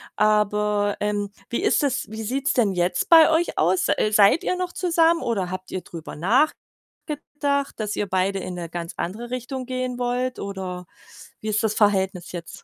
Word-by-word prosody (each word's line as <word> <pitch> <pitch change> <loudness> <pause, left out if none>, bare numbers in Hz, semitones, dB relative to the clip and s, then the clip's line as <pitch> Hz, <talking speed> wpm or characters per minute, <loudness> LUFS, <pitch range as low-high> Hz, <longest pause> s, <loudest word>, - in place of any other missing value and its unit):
aber, 210 -1 +2
ähm, 205 -1 -1 0.2
wie 235 - -1
ist - - +2
das 270 -3 0
wie 220 0 -6
sieht's 275 +8 0
denn 225 -6 +2
jetzt 175 0 0
bei 325 -2 +8
euch 330 +2 +1
aus? 180 +4 +2
Äh, 215 - +2
seid 210 +8 +5
ihr 365 - 0
noch 360 -1 -3
zusammen 335 -2 +2
oder 195 -6 -1
habt 185 0 -6
ihr 185 - -3
drüber 165 -2 -9
nachgedacht, 280 - -2
dass 210 -1 -2
ihr 205 - -2
beide 190 +1 0
in 180 -1 -5
'ne 170 -2 -6
ganz 170 0 -5
andere 225 +7 -4
Richtung 255 +1 -4
gehen 255 -1 -3
wollt? 250 +1 -1
Oder 185 -3 -5 0.5
wie 215 - -6
ist 215 +2 +1
das 215 -1 0
Verhältnis 190 -4 +1
jetzt? 170 -2 -7
210 Hz, 180 wpm, -23 LUFS, 190-255 Hz, 0.5 s, bei